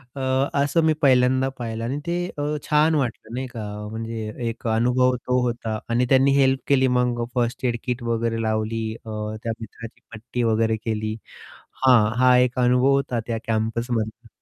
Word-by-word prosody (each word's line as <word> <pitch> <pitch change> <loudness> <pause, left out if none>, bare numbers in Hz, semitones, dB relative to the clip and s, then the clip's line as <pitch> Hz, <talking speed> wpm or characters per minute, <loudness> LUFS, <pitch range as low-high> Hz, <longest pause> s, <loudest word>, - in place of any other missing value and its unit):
अ, 135 - -5 0.4
असं 145 +3 +1
मी 160 - +4
पहिल्यांदा 130 -1 +4
पाहिलं 115 -1 -4
आणि 135 +5 -2
ते 170 - 0 0.2
अ, 145 - -2 0.3
छान 155 +1 +4
वाटलं, 120 -4 -3
नाही 130 +1 -3
का? 115 -3 -7 0.3
म्हणजे 110 -1 -5 0.2
एक 115 +1 -6
अनुभव 125 +3 +2
तो 125 0 +2
होता 115 -3 -2
आणि 120 +2 +2
त्यांनी 135 +1 +5
हेल्प 135 -1 +3
केली. 130 -2 +4
मग 125 -1 +1
फर्स्ट 120 +1 -1
एड 120 -1 +1
किट 125 -1 -3
वगैरे 115 -1 -1
लावली 110 +1 -1 0.2
अ, - - -8 0.3
त्या 115 - -1
मित्राची 115 +1 -10
पट्टी 120 +3 -4
वगैरे 110 0 +2
केली. 110 -1 -2 0.7
हां, 115 -5 +5
हा 125 -1 +6
एक 125 0 +2
अनुभव 125 +2 +3
होता 135 -3 +1
त्या 115 - -1
कॅम्पसमधला. 115 +1 -2
120 Hz, 165 wpm, -23 LUFS, 115-130 Hz, 0.7 s, हा